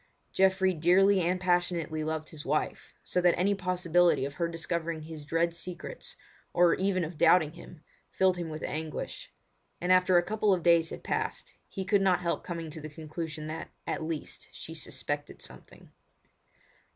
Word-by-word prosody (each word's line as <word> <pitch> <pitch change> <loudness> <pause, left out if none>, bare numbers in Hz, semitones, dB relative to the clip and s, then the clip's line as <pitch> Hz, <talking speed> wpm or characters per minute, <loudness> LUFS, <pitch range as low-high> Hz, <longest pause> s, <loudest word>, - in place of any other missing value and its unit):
Geoffrey 190 0 +3
dearly 185 +4 +4
and 180 +2 +1
passionately 175 -3 0
loved 155 0 -3
his 150 -2 -8
wife, 150 +3 -2
so 180 - 0
that 175 -1 +4
any 195 +3 +3
possibility 175 -5 +2
of 140 - -5
her 170 +3 -1
discovering 165 -1 -3
his 155 -2 -8
dread 165 +1 +1
secrets, 180 - -6 0.4
or 175 -1 +5
even 190 -1 +1
of 160 0 -6
doubting 160 -4 +5
him, 170 -2 -13 0.3
filled 185 -1 +2
him 170 -2 -4
with 155 0 -6
anguish; 155 0 -5 0.5
and 180 +1 0
after 185 0 +5
a 175 - +4
couple 210 +1 +2
of 175 - -6
days 170 -1 +4
had - - -8
passed, - - -3
he 190 - -5
could 200 +1 +3
not 185 -2 +3
help 170 -1 -1
coming 165 -3 -5
to 160 0 -8
the 155 - -7
conclusion 155 0 -6
that, 155 +1 -5 0.2
at - - -2
least, 160 -1 -5
she 160 - -8
suspected 145 -1 -4
something. - - -13
170 Hz, 170 wpm, -29 LUFS, 155-180 Hz, 0.5 s, or